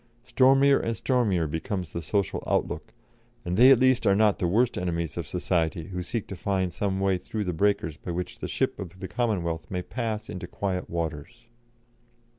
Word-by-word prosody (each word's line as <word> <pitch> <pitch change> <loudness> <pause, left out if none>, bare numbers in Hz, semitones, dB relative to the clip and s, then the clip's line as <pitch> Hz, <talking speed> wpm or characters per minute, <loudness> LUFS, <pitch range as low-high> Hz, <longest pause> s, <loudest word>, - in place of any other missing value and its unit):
Stormier 135 +2 +5
and 115 -1 -2
stormier 105 -9 +1
becomes 80 +3 -3
the 85 - -3
social 100 +5 -1
outlook, - - -1 0.5
and 90 0 -1
they 125 +5 +8
at 135 - +8
least 130 0 +3
are 100 - +5
not 105 -1 +3
the 90 - +1
worst 115 +7 +2
enemies 85 -3 -2
of 85 -3 -4
Society 85 -1 -1
who 90 -1 -4
seek 110 +4 -3
to 95 - -7
find 95 -1 -1
some 95 0 -1
way 95 -1 +1
through 105 +4 -4
the 90 -2 -2
breakers 85 -4 +1
by - - -9
which 90 +1 -4
the - - -4
ship - - -1
of 95 0 -8
the 95 - -5
Commonwealth 85 -8 -1
may 90 -1 -3
pass 110 -2 -3
into 90 - -6
quiet 95 -2 -3
waters." 85 +8 -5
95 Hz, 190 wpm, -27 LUFS, 85-110 Hz, 0.5 s, they